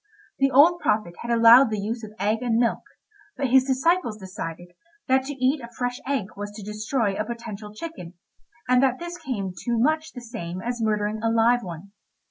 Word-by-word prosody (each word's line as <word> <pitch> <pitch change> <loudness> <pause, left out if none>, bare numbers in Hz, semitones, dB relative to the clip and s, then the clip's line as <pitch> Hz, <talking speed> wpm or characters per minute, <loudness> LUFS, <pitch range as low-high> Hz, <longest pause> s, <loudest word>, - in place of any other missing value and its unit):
The 275 0 +4
old 305 +7 +6
prophet 210 - 0
had 235 - -7
allowed 235 +2 +7
the 215 - -2
use 225 +3 -4
of 215 - -8
eggs 210 +3 0
and 235 -2 +1
milk, 235 0 +1 0.6
but 270 -3 -1
his 260 0 +6
disciples 265 -2 +1
decided 175 -3 -7 0.4
that 265 0 +3
to 285 - -4
eat 265 +2 +1
a 235 - -9
fresh 245 +1 -2
egg 265 -8 -1
was 205 +1 -5
to 210 - -8
destroy 210 +1 -1
a 215 - -2
potential 215 -2 -7
chicken, 215 - -8 0.5
and 250 0 +4
that 260 -2 +2
this 345 +1 -7
came 215 - -4
to 235 +5 -2
much 310 +5 +1
the 245 - -8
same 185 -7 -6
as 240 +3 -4
murdering 215 0 0
a 225 - +1
live 230 +2 +3
one. 180 0 -9
235 Hz, 195 wpm, -24 LUFS, 210-265 Hz, 0.6 s, allowed